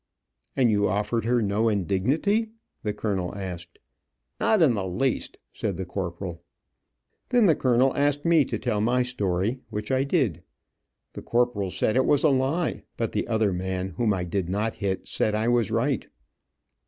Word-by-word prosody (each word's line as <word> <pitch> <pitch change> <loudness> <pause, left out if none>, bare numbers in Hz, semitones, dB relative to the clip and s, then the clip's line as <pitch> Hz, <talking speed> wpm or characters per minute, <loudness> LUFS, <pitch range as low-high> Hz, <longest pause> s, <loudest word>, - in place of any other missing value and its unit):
"And 125 -4 +4
you 105 -1 +2
offered 105 +3 -1
her 120 0 +2
no 105 +3 +1
indignity?" 130 - +1 0.3
the 105 - -1
colonel 100 -3 -2
asked. 90 -3 -7 0.6
"Not 215 -6 +4
in 140 -6 +5
the 100 -4 -2
least," 125 +8 -1 0.2
said - - -3
the 95 - -4
corporal. 85 -1 -5 0.9
Then 245 -3 +4
the 165 -5 +5
colonel 130 +1 +2
asked 145 +1 +1
me 165 -3 +5
to 115 - -3
tell 105 0 -1
my 125 +3 +2
story, 105 -1 -1
which 105 +3 -4
I 130 0 +2
did. 135 - 0 0.7
The - - -7
corporal 120 -5 0
said 110 - 0
it 130 - +3
was 145 -1 +3
a 155 - +6
lie, 140 +6 0 0.2
but 115 -2 -1
the - - -2
other 110 -4 +1
man, 95 +1 -3
whom 105 +5 0
I 95 -3 -1
did 90 0 -2
not 105 +4 -1
hit, 95 -2 -3
said 105 - 0
I 110 +2 0
was 120 -4 +2
right. 115 +3 0
110 Hz, 170 wpm, -26 LUFS, 95-130 Hz, 0.9 s, a